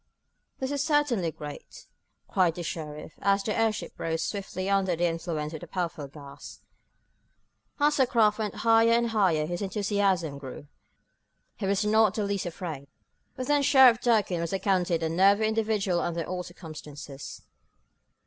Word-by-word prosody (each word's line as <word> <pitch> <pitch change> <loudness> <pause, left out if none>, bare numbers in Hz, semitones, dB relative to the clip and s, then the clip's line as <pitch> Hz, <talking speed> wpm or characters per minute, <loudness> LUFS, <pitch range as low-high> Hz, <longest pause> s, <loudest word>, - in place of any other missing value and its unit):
"This 265 +1 -3
is 285 -1 -1
certainly 285 - +1
great!" 150 -1 -10 0.4
cried 180 -4 +2
the 175 - -5
sheriff, 155 -2 -6
as 200 0 +2
the 215 - -2
airship 225 -1 -1
rose 165 0 -1
swiftly 190 -2 -4
under 195 -2 +2
the 175 +2 0
influence 165 -2 -3
of 155 - -5
the - - -9
powerful 170 -5 -3
gas. 140 0 -12 1.2
As 295 +1 +3
the 265 -2 +4
craft 225 -4 +3
went 215 -1 -2
higher 225 0 +5
and 235 0 +2
higher 185 -8 +2
his 175 +3 -4
enthusiasm 195 -6 0
grew. 135 +1 -9 0.9
He 195 - -3
was 200 +2 +1
not 215 -1 +4
the 215 - -1
least 200 -2 -2
afraid, 160 -5 -6 0.5
but 255 - -4
then 290 +1 +2
Sheriff 260 -4 +6
Durkin 210 -7 +2
was 170 +1 -3
accounted 185 -4 +1
a - - +1
nervy 195 +5 +4
individual 215 -5 0
under 170 -1 -2
all 180 +2 -4
circumstances. 150 -5 -9
190 Hz, 155 wpm, -27 LUFS, 165-220 Hz, 1.2 s, Sheriff